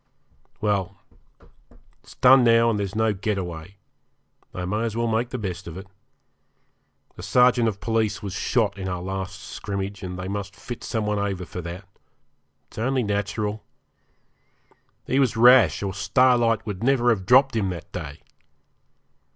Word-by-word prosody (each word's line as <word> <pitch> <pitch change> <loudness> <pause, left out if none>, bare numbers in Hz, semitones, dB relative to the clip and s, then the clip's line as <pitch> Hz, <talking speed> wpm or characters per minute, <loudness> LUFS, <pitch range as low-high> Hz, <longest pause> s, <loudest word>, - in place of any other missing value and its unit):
Well, 100 -2 -1 1.0
it's - - -16
done 130 0 +6
now, 115 0 +4
and 105 - -1
there's 100 0 -3
no 110 -1 +2
get 105 +1 -2
away. 90 0 -6 0.8
I 90 - -5
may 105 +4 -1
as 115 -1 -2
well 115 - 0
make 115 +2 0
the 130 - -4
best 95 -5 -5
of 85 +1 -8
it. 95 - -8 1.3
A - - -5
sergeant 125 -1 +3
of 100 -3 -2
police 110 -1 -1
was 100 -3 -5
shot 100 0 0
in 95 0 -4
our 90 -1 -3
last 95 +1 -5
scrimmage, 100 -1 -5
and 90 -2 -6
they 95 0 -5
must 100 0 -5
fit 120 - -8
some 110 -2 -2
one 105 0 -1
over 100 -3 -2 0.2
that. 90 +3 -8 0.8
It's - - -10
only 130 +2 0
natural. 105 +1 -2 1.4
He 135 - +1
was 125 -4 +1
rash, 120 -1 +6
or 95 -1 -3
Starlight 115 +1 +2
would 105 -1 -5
never 120 -2 +3
have 95 -5 -2
dropped 130 0 +5
him 100 -4 0
that 85 -3 -7
day. 70 -5 -7
105 Hz, 160 wpm, -24 LUFS, 95-115 Hz, 1.4 s, done